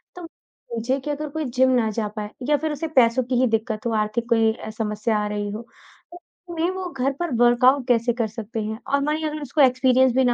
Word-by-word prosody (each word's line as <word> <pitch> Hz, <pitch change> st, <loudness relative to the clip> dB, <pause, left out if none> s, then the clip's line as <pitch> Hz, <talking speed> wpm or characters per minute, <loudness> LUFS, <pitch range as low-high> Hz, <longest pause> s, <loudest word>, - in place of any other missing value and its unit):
तो 355 Hz, -, -8 dB
पूछे 255 Hz, -4 st, -5 dB
कि 295 Hz, +3 st, -4 dB
अगर 300 Hz, +1 st, -4 dB
कोई 315 Hz, +1 st, -4 dB
जिम 260 Hz, +1 st, +2 dB
ना 220 Hz, -2 st, 0 dB
जा 215 Hz, 0 st, -2 dB
पाए, 210 Hz, -1 st, -4 dB, 0.2 s
या 295 Hz, -, +4 dB
फिर 310 Hz, +2 st, -2 dB
उसे 300 Hz, +2 st, -3 dB
पैसों 235 Hz, +1 st, +3 dB
की 250 Hz, +1 st, -2 dB
ही 255 Hz, -, +4 dB
दिक्कत 220 Hz, 0 st, -2 dB
हो, 235 Hz, -, 0 dB
आर्थिक 235 Hz, +3 st, -4 dB
कोई 225 Hz, -1 st, +4 dB
अ, 220 Hz, -, -9 dB
समस्या 215 Hz, 0 st, -2 dB
आ -, -, -2 dB
रही 205 Hz, 0 st, -3 dB
हो, 215 Hz, -, -5 dB, 0.5 s
तो 350 Hz, -, -10 dB, 0.4 s
ऐसे 320 Hz, -, 0 dB
में 355 Hz, -, +1 dB
वो 375 Hz, -1 st, -4 dB
घर 270 Hz, 0 st, -1 dB
पर 345 Hz, -3 st, -2 dB
वर्कआउट 250 Hz, +3 st, +4 dB
कैसे 240 Hz, 0 st, +2 dB
कर 230 Hz, -1 st, -1 dB
सकते 225 Hz, +1 st, -6 dB
हैं? 215 Hz, +1 st, -4 dB
और 280 Hz, 0 st, +1 dB
मानिए 310 Hz, +1 st, -1 dB
अगर 305 Hz, 0 st, -6 dB
उसको 290 Hz, +2 st, 0 dB
एक्सपीरियंस 260 Hz, 0 st, +4 dB
भी 265 Hz, -, +4 dB
ना 245 Hz, -1 st, +3 dB
245 Hz, 245 wpm, -23 LUFS, 225-280 Hz, 0.5 s, या